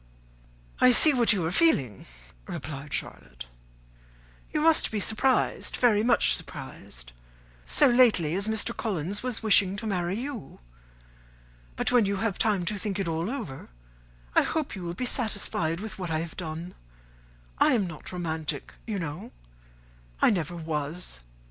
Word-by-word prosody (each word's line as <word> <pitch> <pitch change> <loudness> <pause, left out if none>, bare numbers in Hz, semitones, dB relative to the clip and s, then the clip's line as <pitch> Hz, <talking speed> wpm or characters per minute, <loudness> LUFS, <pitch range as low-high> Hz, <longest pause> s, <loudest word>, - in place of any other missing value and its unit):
"I 255 - +6
see 295 +5 +8
what 240 -3 +3
you 190 -6 +1
are 165 - -1
feeling," 140 - +2 0.4
replied 140 0 -7
Charlotte; 60 -1 -6 1.1
"you 305 - 0
must 320 0 +4
be 215 - -2
surprised, 225 +6 0
very 225 -4 +3
much 235 +1 +4
surprised, - - -8 0.6
so - - +4
lately 235 - +4
as 195 +3 +1
Mr. 220 +2 0
Collins 200 -2 -2
was 250 -3 -3
wishing 200 -3 +4
to 210 - -6
marry 180 -3 -1
you. 260 - -7 1.2
But - - 0
when 240 -5 +4
you 200 - 0
have 220 +1 -1
had - - -13
time 205 -5 +1
to 205 +2 -2
think 200 -1 -3
it 195 -3 -2
all 165 +3 -2
over, 225 - -6 0.6
I - - +6
hope 310 -6 -2
you 190 - -7
will 170 0 -5
be 250 - -3
satisfied 200 - 0
with 215 0 -7
what 180 -2 -4
I 160 - 0
have 165 0 -7
done. 165 +1 -6 0.9
I - - +5
am 220 -6 +2
not 165 -4 -9
romantic, 160 -4 -4
you 215 -3 -2
know. 180 +6 -6 0.9
I - - +5
never 175 -4 -2
was. 155 - -4
195 Hz, 155 wpm, -27 LUFS, 160-225 Hz, 1.2 s, see